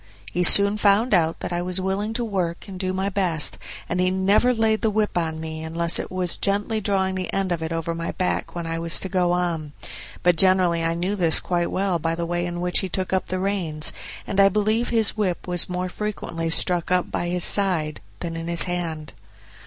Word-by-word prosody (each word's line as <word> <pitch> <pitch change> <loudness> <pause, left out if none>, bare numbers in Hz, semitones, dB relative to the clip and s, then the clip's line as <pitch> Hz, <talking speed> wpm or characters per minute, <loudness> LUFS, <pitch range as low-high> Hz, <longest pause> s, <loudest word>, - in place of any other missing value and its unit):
He 180 - -1
soon 200 +3 +7
found 210 +3 +3
out 165 -3 +1
that - - -4
I 175 - -1
was 180 +1 0
willing 195 +3 -2
to 240 +1 -2
work 185 -5 -3
and 190 -2 -8
do 185 0 -1
my 190 +1 -2
best, 185 -6 0 0.3
and 175 - -2
he 185 0 +2
never 195 +6 +2
laid 225 -2 +1
the 220 - +2
whip 215 0 -1
on 160 -2 -2
me 160 0 -6
unless 170 +1 +2
it - - -6
was 185 -2 -2
gently 205 +2 -1
drawing 190 -1 0
the 185 -1 -4
end 195 -2 -1
of 170 -2 -1
it 160 0 -4
over 165 0 -2
my 165 0 -4
back 185 -1 -2
when 170 -1 -4
I 165 0 -3
was 165 0 0
to 190 - -4
go 180 -2 +1
on; 170 -4 -2 0.5
but 175 -1 +3
generally 180 -2 +3
I 165 0 0
knew 180 +4 -2
this 170 -5 +3
quite 175 -1 -1
well 190 -2 -1
by 165 +1 -1
the 170 0 -3
way 175 +1 -2
in 175 0 -5
which 180 0 +3
he 190 - -2
took 185 +1 -2
up 190 - 0
the 185 - -3
reins, 180 -6 0 0.3
and 200 - -2
I 195 0 +7
believe 215 +4 0
his 225 -3 +2
whip 190 -6 -2
was 180 -1 +1
more 180 0 -2
frequently 180 -4 -4
stuck 175 +1 +1
up 180 0 0
by 175 - -2
his 175 0 0
side 170 -7 +2 0.2
than 165 -1 -4
in 165 0 -5
his 170 0 +3
hand. 165 -4 -4
180 Hz, 225 wpm, -23 LUFS, 170-195 Hz, 0.5 s, soon